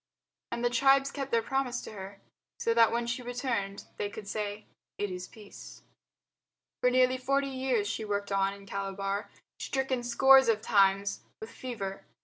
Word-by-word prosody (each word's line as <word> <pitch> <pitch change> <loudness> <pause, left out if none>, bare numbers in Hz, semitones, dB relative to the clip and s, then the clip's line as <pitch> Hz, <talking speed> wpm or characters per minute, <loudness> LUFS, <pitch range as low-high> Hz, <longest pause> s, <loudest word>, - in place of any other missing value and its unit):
And 235 0 -2
the 240 - +2
tribes 270 +2 +4
kept 275 -2 -4
their 230 -1 +2
promise 260 -1 -1
to - - -9
her, 200 -1 -9 0.4
so 230 - +1
that 230 -1 +5
when 235 0 0
she 235 +1 -2
returned 240 -5 -3
they 205 - -2
could 205 0 -9
say, 210 0 -4 0.3
"It 205 -2 -2
is 180 0 -6
peace." 210 -2 -13 1.0
For 250 - +5
nearly 255 0 +3
forty 275 +2 +1
years 260 -5 0
she 220 +1 -3
worked 205 -1 -2
on 195 0 +2
in 200 0 -11
Calabar, 195 +1 -3 0.3
stricken 265 -2 -1
scores 265 +1 +6
of 220 -2 +3
times 200 -1 +3 0.2
with 220 +1 -8
fever. 215 -7 -6
230 Hz, 165 wpm, -30 LUFS, 200-255 Hz, 1.0 s, scores